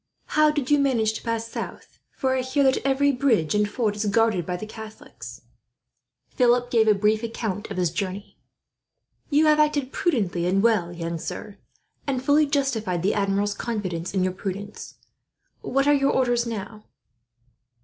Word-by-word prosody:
"How 305 0 +4
did 295 -3 -2
you 290 - +5
manage 235 -6 +2
to - - -6
pass 230 -1 -2
south, - - -8
for 260 -1 -1
I 260 - +1
hear 260 +3 0
that 265 0 +3
every 275 +1 +3
bridge 245 - +1
and 210 0 +1
ford 210 -1 -1
is 210 +1 -2
guarded 205 -4 +2
by 180 -1 -2
the 215 - -6
Catholics?" 220 0 -10 0.9
Philip 245 -1 +2
gave 225 -2 +3
a 210 - +5
brief 210 +2 +2
account 220 -3 -4
of 200 - -6
his 175 -3 +1
journey. 190 +3 -5 0.9
"You 305 +1 +4
have 305 0 +4
acted 290 -3 +1
prudently 195 - 0
and 195 +2 +2
well, 210 -7 +2
young 170 -1 -4
sir; 205 +5 -7 0.5
and 260 -2 -2
fully 295 +2 +4
justified 230 - -1
the 200 - +2
Admiral's 200 0 0
confidence 190 -7 -4
in 185 - +2
your 185 0 0
prudence. 200 +2 -6 0.7
What 275 +1 0
are 290 - +6
your 275 -1 +3
orders 245 -2 +1
now?" 215 -1 -6
220 Hz, 170 wpm, -24 LUFS, 200-265 Hz, 0.9 s, are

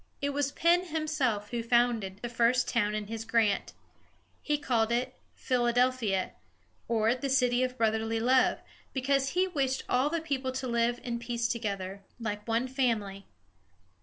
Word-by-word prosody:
It 285 0 -1
was 280 -1 -1
Penn 345 +2 +3
himself 300 - -1
who 240 -1 -1
founded 230 -4 +1
the - - -1
first 240 +1 +2
town 210 -3 +1
in 215 -1 -3
his 225 +1 -5
grant. 225 -3 +1 0.7
He 295 -1 0
called 235 -6 +1
it 250 +2 0 0.2
Phil 245 -2 0
a 240 - +2
del´phi 250 -4 +2
a, 185 - -4 0.6
or 225 0 +2
the 270 +2 -3
"City 250 -2 +3
of 255 0 -1
Brotherly 225 0 +1
Love," 255 +3 +3 0.3
because 270 +1 +1
he 375 +1 +4
wished 270 -6 -1
all 255 +4 +2
the 335 +2 -1
people 275 -5 -2
to 260 0 -3
live 235 0 +1
in 235 -1 -3
peace 235 0 -2
together, 200 -4 -3 0.2
like 210 -2 -4
one 230 +3 +1
family. 220 -7 -1
240 Hz, 165 wpm, -29 LUFS, 225-265 Hz, 0.7 s, he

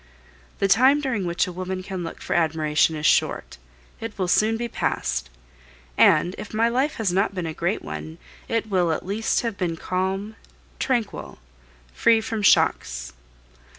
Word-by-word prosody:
The 195 - +1
time 260 +8 +5
during 240 -10 -2
which 170 0 +1
a 180 - -6
woman 185 +1 -4
can 190 -2 -5
look 165 - -7
for - - -2
admiration 160 -1 +2
is 155 0 -4
short, - - +1 0.4
it 225 -1 -7
will 185 -2 -1
soon 215 +5 +3
be 240 +1 -3
past; 60 - -2 0.7
and 165 - +4
if 210 +1 -7
my 225 +1 +3
life 265 +5 0
has 205 -6 -1
not 195 +1 +1
been 180 -2 -3
a 160 - -4
great 175 +6 -2
one, 75 +1 -7 0.3
it 225 -1 0
will 180 -5 +1
at 160 - -3
least 210 +4 0
have 230 -4 -4
been 170 -3 -1
calm, 190 +5 -2 0.4
tranquil, 240 -5 -2 0.6
free 230 -1 +4
from 220 0 -3
shocks. - - +2
190 Hz, 165 wpm, -24 LUFS, 165-220 Hz, 0.7 s, time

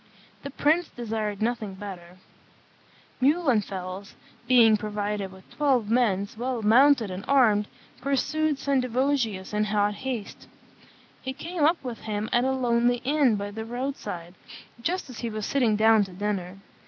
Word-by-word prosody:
The 280 - -6
prince 310 +5 +1
desired 215 -3 -3
nothing 220 -4 -2
better; 185 -3 -9 1.0
Muhlenfels, 210 - 0 0.3
being 235 -3 +6
provided 210 -2 -3
with 190 0 -16
twelve 260 -7 +1
men 210 -5 +2
well 245 -2 -2
mounted 240 0 +5
and 185 +2 -6
armed, 220 -7 +4 0.3
pursued 285 +3 0
Sendivogius 255 -7 0
in 210 0 +1
hot 210 0 +1
haste. 240 -2 -6 0.7
He 260 0 -4
came 330 +3 -4
up 325 +1 +2
with 245 -4 -5
him 215 0 -3
at 240 +1 +3
a 265 - +2
lonely 245 -2 +1
inn 275 -3 +3
by 205 0 -4
the 220 +2 -5
road 250 +4 -3
side, 175 -7 -7 0.5
just 360 +9 -2
as 255 -4 -9
he 235 - -3
was 215 -1 -4
sitting 245 -6 +2
down 220 0 +5
to 190 - -12
dinner. 190 -1 -3
225 Hz, 145 wpm, -26 LUFS, 205-265 Hz, 1.0 s, being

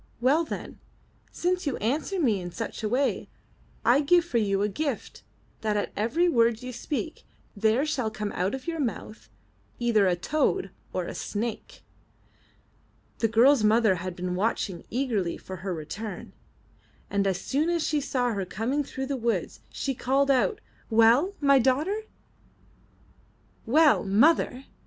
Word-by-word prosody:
*Well 275 +7 +3
then, 315 - -7 0.5
since 360 -1 -1
you 280 - -1
answer 300 - -1
me 225 - +2
in 175 - -5
such 225 +5 -5
away, 250 +6 0 0.6
I 250 +5 +5
give 345 +4 +4
you 205 -4 +2
for 200 - 0
a - - +2
gift 275 +5 -4 0.4
that 215 -1 0
at 205 - -2
every 270 +12 +1
word 235 -5 +2
you 250 0 -6
speak 310 +6 -4 0.3
there 220 +6 +2
shall 260 -7 -1
come 210 -1 -4
out 185 +7 -1
of 265 - -9
your 335 -1 -3
mouth 225 -4 -4 0.5
either 225 -5 +3
a 180 - +2
toad 305 - 0 0.2
or - - -2
a - - -6
snake.*' 220 +1 -5 1.4
The 225 - +3
girl's 235 +3 +5
mother 215 -1 +4
had 180 0 -5
been 180 0 -3
watching 190 -2 -2
eagerly 225 -9 -1
for 185 - -8
her 190 +2 -5
return, 180 +5 -6 0.8
and 200 -1 +1
as 190 -1 0
soon 295 - 0
as 340 -2 0
she 300 -1 0
saw 250 -3 0
her 200 -2 -2
coming 230 +10 -2
through 265 -1 -5
the 275 +1 -2
woods, 230 -8 -2
she 275 - -3
called 275 +3 +1
out, 275 - +1 0.3
'Well, 235 - +4
my 280 -2 +5
daughter?" 305 - +1 1.6
''Well, 300 +4 +5
mother!" 250 +5 +3
240 Hz, 150 wpm, -27 LUFS, 210-285 Hz, 1.6 s, I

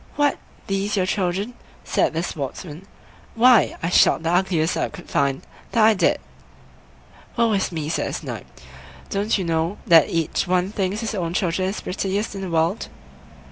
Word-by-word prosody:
"What! 290 -1 +2 0.3
these 200 +1 -1
your 185 - +2
children!" 190 +4 -1 0.3
said - - +1
the 165 +2 -1
Sportsman; 155 +3 -6 0.5
"why, 245 -1 +5
I 165 - +1
shot 165 - +4
the 165 - 0
ugliest 175 -2 +1
I - - -1
could 180 - -11
find, 140 -1 0 0.3
that 225 -3 +5
I 220 - +6
did!" 200 - +2 1.2
"Woe 230 -2 +3
is 195 -2 0
me!" 155 -3 -3
said 160 - -1
the - - -6
Snipe; - - -6 0.6
"don't 205 +3 +1
you 190 - -2
know 165 +3 -1
that 165 -7 +6
each 165 +3 -1
one 180 +1 +1
thinks 200 +1 -2
his 225 0 -3
own 175 -4 -2
children 185 0 0
the 205 - -6
prettiest 195 +3 -2
in 195 - -6
the 190 - -4
world?" 165 +4 0
185 Hz, 175 wpm, -22 LUFS, 165-205 Hz, 1.2 s, I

